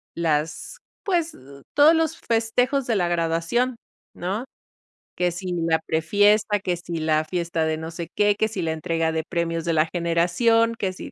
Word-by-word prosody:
las 160 Hz, -, -1 dB, 0.3 s
pues, 340 Hz, -4 st, 0 dB, 0.4 s
todos 295 Hz, +3 st, +7 dB
los 320 Hz, -1 st, 0 dB
festejos 245 Hz, +4 st, 0 dB
de 230 Hz, -, +1 dB
la 180 Hz, -3 st, +1 dB
graduación, 170 Hz, +9 st, 0 dB, 0.4 s
¿no?, 195 Hz, +7 st, -3 dB, 0.7 s
que 180 Hz, -1 st, +1 dB
si 180 Hz, +1 st, -5 dB
la 165 Hz, -2 st, +1 dB
pre-fiesta, 205 Hz, +6 st, +2 dB
que 180 Hz, -2 st, -2 dB
si 170 Hz, 0 st, -6 dB
la 155 Hz, -1 st, +1 dB
fiesta 170 Hz, -1 st, -1 dB
de 160 Hz, 0 st, -1 dB
no 160 Hz, +1 st, -6 dB
sé 170 Hz, 0 st, -6 dB
qué, 205 Hz, 0 st, +3 dB
que 220 Hz, +1 st, +1 dB
si 210 Hz, -4 st, -4 dB
la 160 Hz, -, 0 dB
entrega 160 Hz, +1 st, -1 dB
de 160 Hz, 0 st, -2 dB
premios 165 Hz, -2 st, -2 dB
de 170 Hz, -, +1 dB
la 155 Hz, 0 st, +3 dB
generación, 180 Hz, +7 st, +2 dB
que 195 Hz, -4 st, -2 dB
si, -, -, -9 dB
175 Hz, 175 wpm, -23 LUFS, 165-220 Hz, 0.7 s, todos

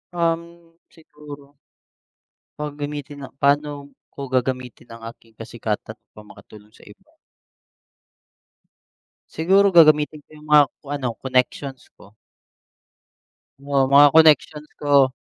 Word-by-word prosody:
Um, 170 Hz, 0 st, -4 dB
siguro. 145 Hz, -3 st, -15 dB, 1.1 s
Pag 150 Hz, -1 st, -5 dB
gamitin 145 Hz, 0 st, -7 dB
na, -, -, -7 dB
paano 145 Hz, +1 st, +1 dB, 0.4 s
ko -, -, -10 dB
gagamitin 125 Hz, -1 st, -4 dB
ang 115 Hz, 0 st, -12 dB
aking 115 Hz, -1 st, -27 dB
kasikatan -, -, -6 dB, 0.2 s
upang 105 Hz, 0 st, -16 dB
makatulong 105 Hz, 0 st, -17 dB
sa -, -, -20 dB
iba? -, -, -19 dB, 2.2 s
Siguro 195 Hz, +5 st, +2 dB
gagamitin 155 Hz, -3 st, +4 dB
ko -, -, -55 dB
yung 150 Hz, 0 st, -16 dB
mga 150 Hz, -1 st, +7 dB, 0.2 s
ko -, -, -24 dB
ano 130 Hz, -5 st, -4 dB
connections 130 Hz, +1 st, -2 dB
ko. 100 Hz, -, -19 dB, 1.5 s
Oo 140 Hz, -1 st, 0 dB
mga 145 Hz, +1 st, +7 dB
connections 150 Hz, -1 st, +3 dB
ko 140 Hz, -3 st, +3 dB
145 Hz, 110 wpm, -21 LUFS, 130-155 Hz, 2.2 s, mga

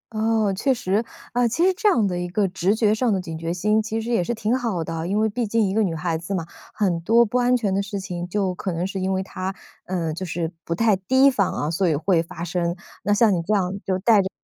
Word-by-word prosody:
哦， 220 Hz, -2 st, +1 dB
确 270 Hz, +8 st, +1 dB
实， 205 Hz, -1 st, 0 dB, 0.3 s
啊， 245 Hz, 0 st, +2 dB
其 290 Hz, +10 st, +1 dB
实 380 Hz, -, +4 dB
这 430 Hz, +2 st, +3 dB
样 235 Hz, -, +3 dB
的 180 Hz, -2 st, -1 dB
一 175 Hz, 0 st, -3 dB
个 195 Hz, +3 st, +1 dB
直 190 Hz, +3 st, +1 dB
觉 215 Hz, -2 st, +3 dB
上 230 Hz, +2 st, +1 dB
的 195 Hz, -, +1 dB
警 165 Hz, -3 st, -6 dB
觉 165 Hz, +1 st, -3 dB
心 210 Hz, +5 st, +2 dB
其 220 Hz, +1 st, -3 dB
实 230 Hz, +2 st, -4 dB
也 230 Hz, -7 st, +2 dB
是 175 Hz, -, -2 dB
挺 225 Hz, +2 st, 0 dB
好 230 Hz, -10 st, -1 dB
的。 165 Hz, 0 st, -4 dB
因 200 Hz, +3 st, 0 dB
为 220 Hz, +1 st, +3 dB
毕 230 Hz, +2 st, -2 dB
竟 220 Hz, 0 st, +2 dB
一 190 Hz, -, -2 dB
个 220 Hz, -, +2 dB
女 180 Hz, -6 st, 0 dB
孩 165 Hz, +1 st, -1 dB
子 180 Hz, +4 st, -4 dB
嘛， 170 Hz, -3 st, -2 dB, 0.3 s
很 185 Hz, -6 st, 0 dB
多 230 Hz, +7 st, +4 dB
不 245 Hz, +3 st, 0 dB
安 250 Hz, 0 st, +3 dB
全 210 Hz, -5 st, -1 dB
的 195 Hz, -, +1 dB
事 200 Hz, 0 st, -4 dB
情 180 Hz, -2 st, -5 dB
就 195 Hz, -1 st, 0 dB
可 185 Hz, +1 st, -4 dB
能 170 Hz, +2 st, -2 dB
是 195 Hz, 0 st, -4 dB
因 190 Hz, +1 st, -1 dB
为 190 Hz, 0 st, -1 dB
她， 190 Hz, 0 st, -5 dB, 0.3 s
呃， 170 Hz, -4 st, -2 dB
就 180 Hz, +4 st, -5 dB
是 170 Hz, -2 st, -3 dB
不 170 Hz, -, -2 dB
太 220 Hz, +2 st, +3 dB
提 260 Hz, +9 st, +4 dB
防 200 Hz, -7 st, +1 dB
啊， 150 Hz, -, -2 dB
所 180 Hz, +1 st, +1 dB
以 155 Hz, -, +2 dB
会 165 Hz, +3 st, +2 dB
发 165 Hz, 0 st, -7 dB
生， 175 Hz, 0 st, -1 dB, 0.3 s
那 205 Hz, -, -1 dB
像 210 Hz, 0 st, +4 dB
你 175 Hz, -, 0 dB
这 205 Hz, +6 st, 0 dB
样 185 Hz, -2 st, 0 dB
就 190 Hz, -1 st, +1 dB
带 210 Hz, +2 st, +4 dB
着 190 Hz, -, -3 dB
195 Hz, 295 characters per minute, -23 LUFS, 175-220 Hz, 0.3 s, 实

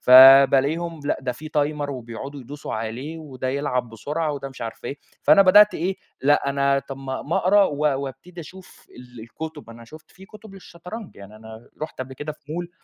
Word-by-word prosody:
فبالاقيهم 135 Hz, +5 st, +7 dB
لأ، -, -, -1 dB
ده 125 Hz, -1 st, -3 dB
في 155 Hz, +5 st, -9 dB
تايمر 145 Hz, -1 st, -1 dB
وبيقعدوا 130 Hz, +3 st, -7 dB
يدوسوا 140 Hz, +1 st, -7 dB
عليه، 120 Hz, +9 st, -5 dB
وده 130 Hz, -4 st, -6 dB
يلعب 130 Hz, -3 st, -2 dB
بسرعة، 150 Hz, +8 st, -3 dB
وده 140 Hz, -1 st, -6 dB
مش 135 Hz, -, -14 dB
عارف 115 Hz, -, -7 dB
إيه. 140 Hz, -, -5 dB, 0.2 s
فأنا 200 Hz, -, +6 dB
بدأت 205 Hz, +3 st, +6 dB
إيه، 185 Hz, +4 st, -2 dB, 0.3 s
لأ، 145 Hz, 0 st, +3 dB
أنا 140 Hz, 0 st, +2 dB
طب 135 Hz, 0 st, -8 dB
ما 135 Hz, -1 st, -5 dB
ما 160 Hz, -, -2 dB
أقرا 200 Hz, +2 st, +4 dB
و 145 Hz, -, -2 dB, 0.3 s
وأبتدي 170 Hz, +6 st, -9 dB
أشوف 185 Hz, +4 st, -14 dB, 0.3 s
الكتب، 150 Hz, +3 st, -9 dB
أنا 115 Hz, 0 st, -12 dB
شُفت 155 Hz, +7 st, -15 dB
في 190 Hz, -, -15 dB
كتب 210 Hz, 0 st, -14 dB
للشطرنج، 185 Hz, +3 st, -10 dB
يعني 100 Hz, +2 st, -12 dB
أنا 110 Hz, +1 st, -13 dB
رُحت 155 Hz, -, -6 dB
قبل 130 Hz, +1 st, -6 dB
كده 150 Hz, +3 st, -6 dB
في 150 Hz, 0 st, -12 dB
مول 175 Hz, +1 st, -5 dB
145 Hz, 185 wpm, -23 LUFS, 130-165 Hz, 0.3 s, فبالاقيهم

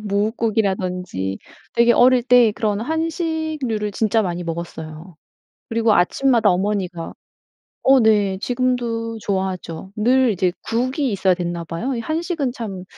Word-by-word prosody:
뭇국이라든지 195 Hz, -, -1 dB, 0.4 s
되게 235 Hz, 0 st, +5 dB
어릴 250 Hz, +1 st, +5 dB
때 245 Hz, -2 st, +5 dB
그런 210 Hz, -1 st, -1 dB
한식류를 315 Hz, -, -2 dB
진짜 220 Hz, +1 st, +1 dB
많이 175 Hz, -2 st, -3 dB
먹었어요. 165 Hz, 0 st, -7 dB, 0.5 s
그리고 230 Hz, -1 st, +2 dB
아침마다 230 Hz, +4 st, +3 dB
어머니가 185 Hz, -2 st, -2 dB, 0.7 s
어 270 Hz, 0 st, +5 dB
네 205 Hz, -4 st, +3 dB
지금도 240 Hz, -2 st, -1 dB
좋아하죠. 190 Hz, -2 st, -3 dB
늘 250 Hz, +3 st, +3 dB
이제 185 Hz, -2 st, 0 dB
국이 255 Hz, +4 st, -1 dB
있어야 190 Hz, -1 st, +2 dB
됐나 175 Hz, -1 st, -4 dB
봐요. 170 Hz, +12 st, -3 dB
이 235 Hz, -, -3 dB
한식은 315 Hz, -1 st, -2 dB
참 195 Hz, -7 st, -6 dB
220 Hz, 285 characters per minute, -21 LUFS, 185-250 Hz, 0.7 s, 되게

